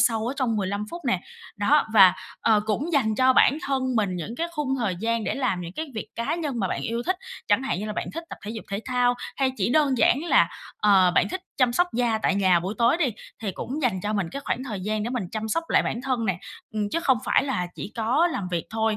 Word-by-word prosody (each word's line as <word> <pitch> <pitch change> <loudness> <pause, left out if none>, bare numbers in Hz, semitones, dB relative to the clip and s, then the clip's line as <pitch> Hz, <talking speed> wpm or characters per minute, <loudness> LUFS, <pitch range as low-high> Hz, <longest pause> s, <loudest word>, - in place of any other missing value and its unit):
sâu 225 -2 +2
ở 250 - -1
trong 240 -5 0
15 200 +1 -2
phút 345 0 -7
nè. 190 -9 +1 0.4
Đó, 275 +8 +3
và, 190 -3 +8 0.3
ờ, 215 -2 +4
cũng 275 +11 -1
dành 230 -8 +2
cho 260 +3 +4
bản 280 +3 +5
thân 270 -1 0
mình 200 -4 0
những 180 +7 -5
cái 335 - -1
khung 290 -4 -1
thời 205 -7 -1
gian 225 +2 -1
để - - -1
làm 195 -9 0
những 170 0 -7
cái 315 +7 -4
việc 220 - -5
cá 235 +7 -1
nhân 295 -8 -3
mà 190 - 0
bạn - - -2
yêu 230 +1 -2
thích. 370 - +1 0.3
Chẳng 205 +6 +3
hạn 265 - -1
như 210 - -4
là 215 - -3
bạn - - -3
thích 330 +1 -5
tập - - -7
thể 210 - -5
dục 225 -1 -6
thể 200 - -2
thao 250 -1 +2 0.2
hay 265 -1 +1
chỉ 205 +3 0
đơn 280 -4 +3
giản 285 +6 +3
là, - - +4 0.3
ờ, 190 -3 +6
bạn - - +3
thích 370 - -4 0.2
chăm 250 -3 +3
sóc 355 +7 +3
da 235 -2 +1
tại 195 - +2
nhà 185 -3 +3
buổi 190 +5 -4
tối 235 +6 +4
đi, 325 -5 +2 0.4
thì 200 -3 -2
cũng 280 +9 -5
dành 215 -7 +1
cho 210 +1 -1
mình 195 -5 -1
cái 280 - -6
khoảng 255 - -2
thời 215 -7 -5
gian 210 +2 -1
để 235 - -3
mình 245 -7 -2
chăm 220 0 -3
sóc 330 +9 0
lại - - +4
bản 235 - -3
thân 255 -4 -1
nè, 185 -3 0 0.4
ừm, 210 -1 -1
chứ 335 - +1
không 265 -8 +3
phải - - +3
là 215 -10 -1
chỉ 210 - -7
có 245 +9 +2
làm 200 - -3
việc 170 -2 -1
thôi. 220 -1 0
230 Hz, 270 wpm, -25 LUFS, 205-270 Hz, 0.4 s, và